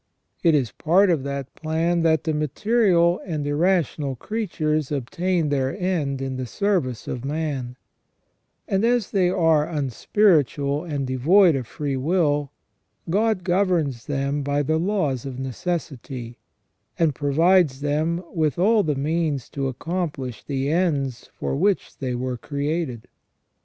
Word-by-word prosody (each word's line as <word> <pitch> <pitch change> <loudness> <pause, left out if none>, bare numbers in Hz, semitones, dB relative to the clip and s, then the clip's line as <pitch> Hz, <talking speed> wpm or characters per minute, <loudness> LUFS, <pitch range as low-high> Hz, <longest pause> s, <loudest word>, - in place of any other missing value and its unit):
It 165 -3 +4
is 130 -6 +1
part 180 +4 +3
of 160 -5 +1
that 140 -1 -4
plan 165 +2 0
that 160 -2 +2
the 160 - -1
material 175 - +2
and 155 -5 -3
irrational 150 -3 +1
creatures 155 - -2
obtain 170 +4 -1
their 135 +3 0
end 150 -8 -1
in 130 -1 -3
the 130 -1 -4
service 170 - -1
of 125 - -4
man; 140 -4 -3 0.9
and 195 +1 +1
as 235 -2 +2
they 185 -3 +3
are 165 -4 +2
unspiritual 145 - +1
and 145 -5 -2
devoid 160 +8 +4
of 130 -4 -3
freewill, 145 +1 0 0.6
God 210 -1 +1
governs 175 -9 0
them 140 0 -1
by 145 +1 0
the 155 +3 +1
laws 165 - 0
of 130 -2 -6
necessity, 130 -3 -5 0.6
and 160 -3 +2
provides 150 +1 +3
them 155 +4 0
with 155 -5 0
all 210 +5 +4
the 150 -6 0
means 150 -1 -1
to 140 -1 -2
accomplish 140 - -4
the 140 0 -2
ends 145 -8 0
for - - -3
which 195 +6 0
they 130 -3 -2
were 125 0 -3
created. 145 -2 -3
150 Hz, 135 wpm, -23 LUFS, 135-175 Hz, 0.9 s, It